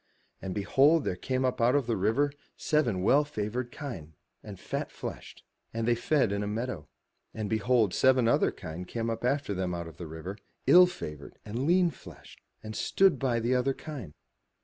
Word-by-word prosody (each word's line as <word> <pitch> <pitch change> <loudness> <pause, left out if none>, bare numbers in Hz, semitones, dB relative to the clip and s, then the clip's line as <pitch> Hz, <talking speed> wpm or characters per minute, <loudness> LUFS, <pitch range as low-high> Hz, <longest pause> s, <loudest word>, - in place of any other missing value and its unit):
And, 95 -1 -5
behold, 140 +10 +4
there - - -1
came 130 +7 -1
up 125 -2 -1
out 120 +3 +4
of 140 -3 +2
the 115 -1 0
river 115 +9 +1 0.3
seven 120 - +1
well 140 +8 +5
favoured 120 -2 -4
kine 95 - -7 0.3
and - - -10
fat - - -4
fleshed; - - -8 0.3
and 115 0 -1
they 120 - +4
fed 120 -1 +1
in 100 0 -1
a 105 - -2
meadow. 110 - -4 0.5
And 110 -1 -3
behold, 110 -1 +2
seven 130 -3 +4
other - - +3
kine 80 +3 -7
came 115 +3 -3
up 115 - -5
after 135 -3 0
them 90 -2 -2
out 85 -1 -5
of 80 - -12
the 85 - -7
river, 80 +6 -7 0.3
ill 180 +1 +8
favoured 75 - -8
and 120 +7 -3
lean 175 0 +4
fleshed; - - -14 0.2
and 110 0 -7
stood 190 - +3
by 125 -4 +1
the 120 +3 0
other 130 +2 +2
kine. 130 - -8
115 Hz, 190 wpm, -29 LUFS, 100-135 Hz, 0.5 s, ill